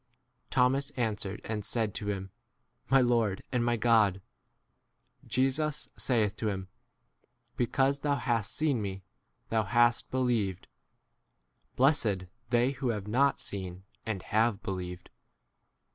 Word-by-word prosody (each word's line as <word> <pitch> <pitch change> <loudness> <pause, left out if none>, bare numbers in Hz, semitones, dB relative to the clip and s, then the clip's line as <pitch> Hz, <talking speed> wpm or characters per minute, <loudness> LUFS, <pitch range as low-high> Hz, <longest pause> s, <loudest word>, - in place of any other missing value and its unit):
r 125 0 -45
Thomas 135 +2 +2
answered 105 -4 -2
and 110 -2 -3
said 110 -1 0
to 105 - -5
him, 95 -2 -3 0.6
My 135 0 +6
Lord 115 -5 +1
and 125 -2 +1
my 120 0 +1
God. 110 -4 +4 1.1
29 - - -20
Jesus 140 +4 0
saith 110 -5 +1
to 110 - -1
him, 95 -2 -4 0.9
Because 135 +3 +1
thou 145 0 +1
hast 115 -6 -1
seen 145 -7 +1
me 100 -2 -2
s 95 - -12 0.5
thou 110 -1 +2
hast 120 +1 +3
believed: 115 -8 0 1.1
blessed 115 -9 +3 0.2
they 120 +2 +3
who 135 -2 -2
have 105 -3 -2
not 135 +6 +2
seen 95 -7 -5 0.2
and 105 -5 -3
have 110 0 +1
believed. 90 -3 -5
115 Hz, 130 wpm, -30 LUFS, 100-130 Hz, 1.1 s, My